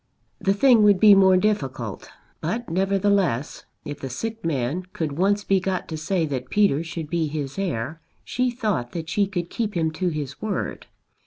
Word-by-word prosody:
The 195 0 +1
thing 240 +1 +5
would 205 -2 +5
be 210 0 +8
more 190 -1 +6
difficult; 135 - -2 0.3
but, 225 +9 -2
nevertheless, 195 - +1 0.2
if 145 -1 -6
the 135 - -5
sick 225 - -5
man 145 +1 -1
could 160 -3 -2
once 200 +7 +1
be 195 -1 +2
got 185 0 -2
to 160 - -4
say 165 +2 0
that 130 -4 -4
Peter 200 -7 +2
should 165 -2 -6
be 165 0 0
his 145 +1 -4
heir 160 -3 -3 0.2
she 250 +1 0
thought 210 - -2
that 165 -2 -5
she 200 +4 +1
could 175 -3 -4
keep 220 -4 -2
him 160 -1 +1
to 180 +3 -1
his 145 -4 -5
word. 215 -2 -3
175 Hz, 180 wpm, -24 LUFS, 150-200 Hz, 0.3 s, be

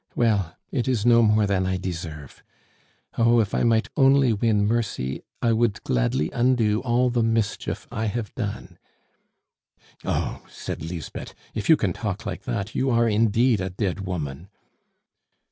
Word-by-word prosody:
Well, 100 -8 +1 0.2
it 130 -2 -1
is 120 -5 0
no 120 -1 +6
more 105 -1 +4
than 95 -2 0
I 95 0 0
deserve. 80 -6 -6 0.8
Oh, 115 +1 +5
if 105 -3 0
I - - +1
might 115 -1 +3
only 135 -3 +5
win 105 -1 +2
mercy, 105 - -1 0.2
I 115 - +3
would 115 -2 0
gladly 60 +5 0
undo 120 -3 +2
all 125 0 +2
the 120 -1 +1
mischief 115 -2 -1
I 110 - -2
have 110 0 -3
done." 100 -7 -5 1.2
"Oh!" - - -2
said - - -6
Lisbeth, 80 -1 -7 0.2
"if 105 -2 -4
you 160 - +8
can 95 -9 0
talk 105 +2 -4
like 100 -4 -5
that, 115 -3 -3
you 130 - 0
are 115 -1 +3
indeed 110 +1 +3
a 95 - -2
dead 95 0 -2
woman." 90 -3 -5
110 Hz, 155 wpm, -24 LUFS, 95-120 Hz, 1.2 s, you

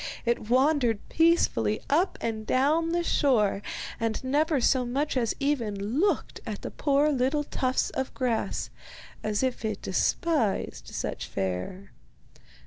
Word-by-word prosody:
It 235 -2 0
wandered 255 -4 +2
peacefully 320 - +3
up 340 +7 +2
and 220 -1 -2
down 305 +6 +2
the 345 +1 0
shore, 225 -12 +2 0.4
and 225 +1 -1
never 290 +3 +2
so 255 +1 +3
much 275 +5 -1
as 235 -4 0
even 275 -7 0 0.2
looked 400 +3 0
at - - -6
the - - -5
poor 290 +1 +2
little 275 +2 +1
tufts 260 -2 -1
of 265 - -3
grass, 245 -4 -1 0.5
as 215 +2 -1
if 260 -2 -1
it 215 -2 -3
despised 255 - 0
such - - -4
fare. 95 - -4
255 Hz, 135 wpm, -27 LUFS, 220-295 Hz, 0.5 s, peacefully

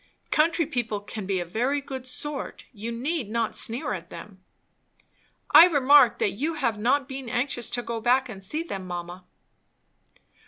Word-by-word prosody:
"Country 330 +1 +2
people 240 -8 -2
can 205 -1 -7
be 195 -2 0
a 175 - -3
very 245 +11 0
good 265 -2 -7
sort. 285 +2 -5
You 225 +1 -6
need 255 +1 -3
not 230 0 -1
sneer 230 -1 0
at 170 -3 -7
them." 185 +2 -11 1.1
"I 345 - +10
remark 285 -6 +5
that 200 - +1
you 300 +11 -2
have 235 -8 -1
not 260 +5 +1
been 265 -2 -7
anxious 245 -1 -2
to 245 0 -2
go 230 -1 -4
back 255 +3 +3
and 195 -5 -9
see 305 - 0
them, 195 - -6
mamma." 175 +1 -7
240 Hz, 165 wpm, -26 LUFS, 205-280 Hz, 1.1 s, I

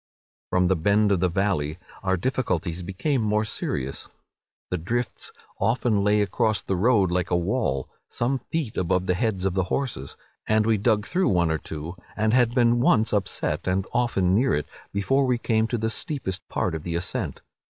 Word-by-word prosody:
"From 90 0 +3
the 95 - +3
bend 100 +5 +3
of 95 - +3
the 90 +1 +2
valley 85 -5 0 0.2
our 95 -1 +1
difficulties 90 -6 -1
became 115 - -1
more 105 0 +1
serious. 70 -9 -4 0.6
The 90 - 0
drifts 120 +9 -3 0.3
often 110 -1 +2
lay 105 0 +3
across 110 +1 0
the 95 - -1
road 100 -2 +3
like 90 0 0
a 90 - +2
wall, 85 - 0 0.2
some 130 +3 0
feet 150 -8 -4
above 90 +1 +1
the 90 - +2
heads 95 -1 -1
of 95 - +1
the 95 -1 +1
horses; 95 - -3 0.3
and 110 0 +3
we 115 - +3
had 105 - -1
dug 105 -2 +2
through 185 +1 +1
one 85 -3 +2
or 80 - 0
two, 80 +3 -7 0.2
and 110 +1 +2
had 120 -1 +3
been 120 -1 +4
once 110 -2 +3
upset, 95 -4 -1
and 95 +1 +1
often 105 -7 +2
near 125 +7 +3
it, 75 - -1 0.3
before 135 +7 +1
we 125 -1 +2
came 110 -2 +1
to 120 - -1
the 110 0 -1
steepest 115 - -4
part 90 - -1
of 80 - -3
the 85 +1 -4
ascent. 85 +1 -3
100 Hz, 190 wpm, -25 LUFS, 90-115 Hz, 0.6 s, been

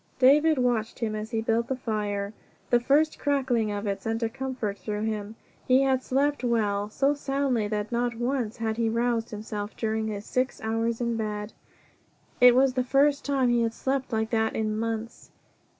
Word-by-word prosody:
David 295 +4 +5
watched 240 -3 0
him 225 -3 -2
as 215 +1 -4
he 225 -1 -2
built 230 +1 +1
the 265 - -1
fire. 210 -4 -3 0.4
The 240 - +5
first 290 +6 +2
crackling 260 -7 +1
of 205 +1 -3
it 200 -1 -2
sent 225 +1 -2
a 225 - +1
comfort 255 -5 -4
through 210 -1 -3
him. 215 -1 -3 0.3
He 260 +1 +5
had 265 -1 +2
slept 280 +2 0
well, 210 -4 0
so 275 +6 +2
soundly 275 -6 -1
that 210 +1 -3
not 240 0 0
once 240 -1 -2
had 220 -1 -2
he 230 -1 +1
roused 230 0 0
himself 210 -1 -6
during 220 -1 -1
his 205 -1 -5
six 255 +1 -1
hours 225 +1 -1
in 235 -1 0
bed. 210 -1 -4 0.9
It 250 0 +8
was 265 0 +4
the 255 -1 0
first 280 +3 +3
time 270 -3 +1
he 240 0 +3
had 230 -1 -1
slept 265 -1 -2
like 220 0 -1
that 220 -1 +1
in 215 -1 -1
months. 225 +1 -4
230 Hz, 185 wpm, -27 LUFS, 220-260 Hz, 0.9 s, It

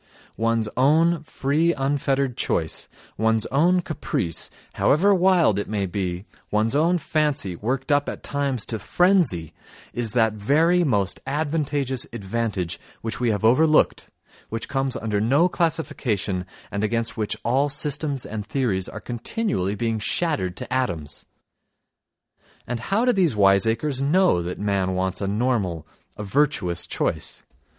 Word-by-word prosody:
One's 115 -1 +1
own 160 +5 +3
free 155 +3 0
unfettered 135 -2 0
choice, - - -2 0.3
one's 110 0 +2
own 175 +7 +3
caprice, 95 - -3 0.2
however 195 +8 +3
wild 180 - +4
it 100 - -4
may 105 -2 -1
be, 90 0 -3 0.2
one's 110 +4 +1
own 170 +4 +3
fancy 150 - 0
worked 130 - -2
up 145 0 +2
at - - -7
times 140 -5 -1
to 110 - -4
frenzy—is 120 - 0
that 110 -3 +3
very 160 +12 +3
"most 100 - 0
advantageous 145 -3 0
advantage" 100 -4 -3 0.2
which 115 0 -4
we 120 -1 +1
have 110 0 0
overlooked, 155 +7 +3 0.4
which 115 0 -4
comes 135 -2 -1
under 105 -2 -1
no 140 +10 +4
classification 120 - -1 0.2
and 100 +1 -2
against 115 +1 -1
which 110 -1 -2
all 135 +5 +2
systems 145 -1 -1
and 105 -1 -5
theories 110 -7 -1
are 110 - -7
continually 120 - -2
being 115 +1 -1
shattered 105 - -1
to - - -5
atoms. 85 - -2 1.4
And 125 -1 -3
how 200 - 0
do 250 - +4
these 175 - +2
wiseacres 110 +7 +3
know 165 - +3
that 90 +1 -5
man 100 -2 0
wants 95 +1 -1
a 100 - -1
normal, 100 - -1 0.3
a 105 - -5
virtuous 100 - 0
choice? - - -3
120 Hz, 135 wpm, -23 LUFS, 105-150 Hz, 1.4 s, wild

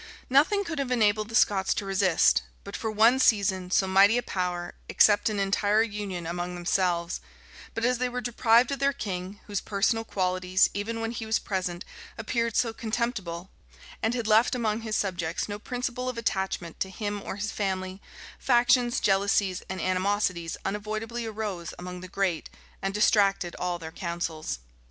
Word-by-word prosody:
Nothing 315 +10 +4
could 330 -5 -4
have 275 -2 -1
enabled 215 -3 +2
the 225 - -5
Scots 200 -5 +3
to 200 - -3
resist, 190 - +3 0.2
but - - -8
for 220 - -3
one 225 +4 +4
season, 195 -6 +2
so 190 - +3
mighty 195 +4 +5
a 245 - 0
power, 180 -2 -3 0.2
except 205 +1 +4
an 210 -2 -2
entire 205 +2 +2
union 205 -5 -4
among 175 +1 -3
themselves; 175 -1 0 0.5
but 230 - 0
as 250 -1 +1
they 250 0 0
were 250 0 -3
deprived 240 0 +3
of 280 - -2
their 280 0 +2
king, 195 -4 -5
whose 205 -2 -3
personal 205 +3 0
qualities, 185 -2 +1
even 225 +3 -3
when 225 0 -2
he 225 -2 -5
was 220 - +2
present, 180 -2 -3 0.3
appeared 230 0 -1
so 230 -2 +1
contemptible, 220 -7 -3 0.5
and 225 +2 +1
had 235 -2 -2
left 220 +3 +4
among 225 -2 -1
his 220 -1 -3
subjects 175 -5 -1
no 205 0 -5
principle 250 +2 -3
of 250 - -5
attachment 190 -6 -2
to 190 - -1
him 205 +1 -4
or - - -5
his 205 +2 -3
family, 190 -1 -3 0.4
factions, 240 -1 +3
jealousies, 195 -1 +2
and 190 0 -4
animosities 185 -2 0
unavoidably 215 +3 -3
arose 210 -6 -4
among 180 0 -7
the 185 - -8
great, 185 -3 -1 0.3
and 195 +1 -2
distracted 195 -4 +3
all 180 -1 -1
their 160 -1 -8
councils. 170 - -4
205 Hz, 170 wpm, -27 LUFS, 185-225 Hz, 0.5 s, mighty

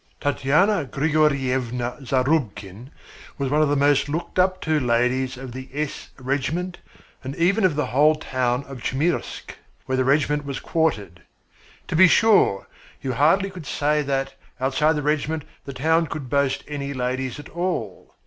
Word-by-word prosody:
Tatyana 150 +6 +2
Grigoryevna 130 -4 0
Zarubkin 130 - -1 0.5
was 135 -2 -2
one 150 +1 +3
of 155 - +3
the 145 - +2
most 145 0 +3
looked 165 +4 -3
up 185 0 +3
to 155 -1 +1
ladies 125 +1 +1
of 130 -1 -8
the 130 +2 -8
S 150 0 -4
Regiment 145 +7 -2 0.4
and 135 +2 -5
even 195 +6 +2
of 180 -6 +3
the 150 - 0
whole 150 +6 +4
town 130 -3 -1
of 135 -2 -10
Chmyrsk, 155 +8 -2 0.3
where 130 - -1
the 130 - +2
regiment 145 +2 +2
was 140 -1 -5
quartered. 105 - -1 0.7
To - - -3
be 185 +3 +8
sure, 200 - +4 0.4
you 130 - -2
hardly 170 +10 +3
could 175 -6 -10
say 150 +1 +1
that, 135 -1 -2 0.3
outside 135 +4 +2
the 150 - -2
regiment, 155 +1 -1 0.2
the 140 - -6
town 160 +5 +2
could 135 -5 -6
boast 140 -1 +1
any 140 -1 -4
ladies 130 +1 -2
at 145 - -10
all. 170 - -4
140 Hz, 160 wpm, -23 LUFS, 130-155 Hz, 0.7 s, be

